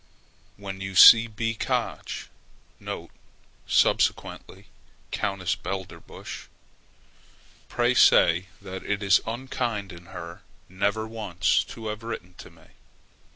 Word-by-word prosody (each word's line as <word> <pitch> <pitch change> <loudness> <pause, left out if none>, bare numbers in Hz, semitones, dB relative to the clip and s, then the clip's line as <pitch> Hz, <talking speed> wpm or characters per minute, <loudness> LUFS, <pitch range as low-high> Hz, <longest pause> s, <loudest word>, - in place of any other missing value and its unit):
When 95 -1 -7
you 95 0 -6
see 115 +5 +9
B. 115 +1 -3
Koch 110 - -3 1.4
[subsequently 95 +2 0 0.5
Countess 95 -3 -1
Belderbusch], 95 0 -8 1.2
pray - - +1
say 85 +2 +5 0.2
that 95 -1 -7
it 100 0 -2
is 100 0 +4
unkind 115 -4 -3
in 85 0 -13
her 85 -2 -9 0.3
never 100 +4 -1
once 105 -5 0
to 115 - -10
have 105 +1 -5
written 90 -6 -7
to - - -11
me. - - -21
100 Hz, 105 wpm, -25 LUFS, 95-110 Hz, 1.4 s, see